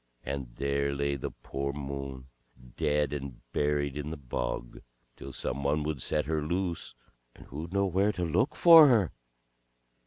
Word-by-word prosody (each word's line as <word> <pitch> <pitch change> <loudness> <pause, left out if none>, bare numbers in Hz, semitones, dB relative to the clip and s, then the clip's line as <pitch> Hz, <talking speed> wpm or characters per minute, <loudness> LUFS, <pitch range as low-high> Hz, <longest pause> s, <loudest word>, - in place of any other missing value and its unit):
And 65 -3 -5
there 70 0 0
lay 70 0 0
the 70 - -4
poor 70 +1 -4
Moon, 70 -2 -6 0.5
dead 75 -1 +1
and 70 -4 -6
buried 75 -1 0
in 75 0 -4
the 80 - -5
bog, - - -4 0.4
till 70 - -9
some 65 +1 -3
one 75 +2 +1
would 75 -3 -3
set 75 +3 0
her 80 +1 -1
loose; 85 +2 -2 0.4
and - - -14
who'd 80 +5 -7
know 100 0 +2
where 95 +3 +2
to 90 -2 -2
look 85 - +1
for 165 -3 +9
her. 110 - +3
75 Hz, 160 wpm, -29 LUFS, 70-85 Hz, 0.5 s, for